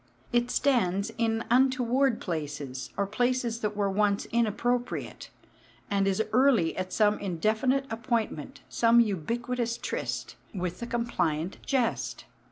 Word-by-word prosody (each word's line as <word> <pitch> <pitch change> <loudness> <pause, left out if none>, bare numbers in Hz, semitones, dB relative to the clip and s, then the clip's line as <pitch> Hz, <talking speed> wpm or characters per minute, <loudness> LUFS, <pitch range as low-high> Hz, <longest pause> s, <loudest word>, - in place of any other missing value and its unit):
It 240 0 +2
stands 220 -8 +1
in 225 0 +1
untoward 255 0 +3
places, 145 -6 -4
or 200 - +1
places 240 +2 0
that 210 -2 -2
were 200 -1 +2
once 200 +1 +1
inappropriate, 235 +2 -1 0.6
and 200 -1 +2
is 195 +3 +2
early 245 -9 +4
at 185 0 -3
some 210 -1 +3
indefinite 220 +9 +1
appointment, 225 - -2
some 235 0 +4
ubiquitous 235 +4 0
tryst, - - -4 0.2
with 180 -1 -3
the 235 - -5
compliant 180 -9 -1
jest. 250 -4 -1
225 Hz, 120 wpm, -28 LUFS, 190-240 Hz, 0.6 s, early